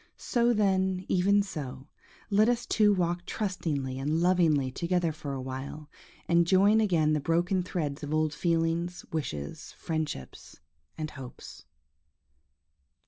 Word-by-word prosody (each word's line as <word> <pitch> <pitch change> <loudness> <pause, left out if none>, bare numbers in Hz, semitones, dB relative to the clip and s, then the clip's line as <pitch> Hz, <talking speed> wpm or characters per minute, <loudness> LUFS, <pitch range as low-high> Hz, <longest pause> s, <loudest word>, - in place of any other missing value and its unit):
So, 240 -1 +1
then, 190 -4 +1
even 200 +3 +3
so, 135 -8 -7 0.4
let 215 +3 +5
us 240 0 0
two 210 -2 +4
walk 175 -2 0
trustingly 150 -10 -2
and 150 +4 0
lovingly 165 -7 +3
together 170 +2 0
for 150 -2 -6
a 130 - -4
while, 135 +3 -7 0.4
and 170 0 +3
join 200 +4 +5
again 165 -7 +2
the 150 - +2
broken 175 +5 +1
threads 160 -5 -3
of 145 -1 -5
old 155 -1 +1
feelings, 170 +2 -1
wishes, 75 - -5
friendships, 155 - -5 0.4
and 155 -1 -4
hopes. 125 - -10
165 Hz, 130 wpm, -29 LUFS, 145-185 Hz, 0.4 s, let